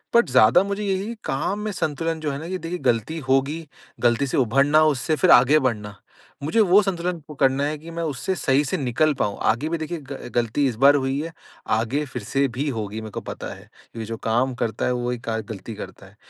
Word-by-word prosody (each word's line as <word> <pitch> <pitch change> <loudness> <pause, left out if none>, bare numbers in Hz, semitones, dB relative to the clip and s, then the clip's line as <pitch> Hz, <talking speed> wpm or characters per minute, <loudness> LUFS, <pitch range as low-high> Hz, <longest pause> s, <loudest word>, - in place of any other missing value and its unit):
But 235 - +5
ज़्यादा 125 - +6
मुझे 200 +1 -3
यही 200 +3 -2
काम 190 +9 -1
में 215 0 -3
संतुलन 165 -2 -2
जो 150 -2 -2
है 140 - -4
ना 160 - -7
ये 185 +2 -3
देखिए 175 0 -5
गलती 120 +5 0
होगी, 140 +5 +1 0.3
गलती 120 +3 +2
से - - -1
उभरना 140 +5 +4
उससे 155 +1 +1
फिर 185 - +4
आगे 135 +5 +7
बढ़ना। 105 -6 -2 0.5
मुझे 160 +10 +1
वो 200 0 +6
संतुलन 180 -2 -2
पकड़ना 140 -2 +1
है 150 +1 -2
कि 160 +3 -11
मैं 170 0 -4
उससे 160 +5 -2
सही 140 -4 +2
से 190 - -1
निकल 145 +2 +1
पाऊँ। 100 - -1
आगे 130 +8 +1
भी 170 - -1
देखिए 160 +1 -4
गल 135 -3 -7
गलती 120 +4 +1
इस 125 - -2
बार 145 +1 +8
हुई 135 0 0
है 165 +1 -6 0.5
आगे 135 +7 -1
फिर 125 -3 -6
से 140 +6 +1
भी 130 +4 -3
होगी 110 -3 -4
मेरे 110 -1 -8
को - - -5
पता - - -6
है। - - -15 0.3
ये 110 - -4
जो 115 +1 -5
काम 120 +4 +1
करता 115 -2 -2
है 125 - +1
वही 125 0 -2
क 110 -1 -1
गलती 110 +1 -7
करता 100 - -9
है। 100 +2 -18
140 Hz, 225 wpm, -23 LUFS, 120-165 Hz, 0.5 s, बार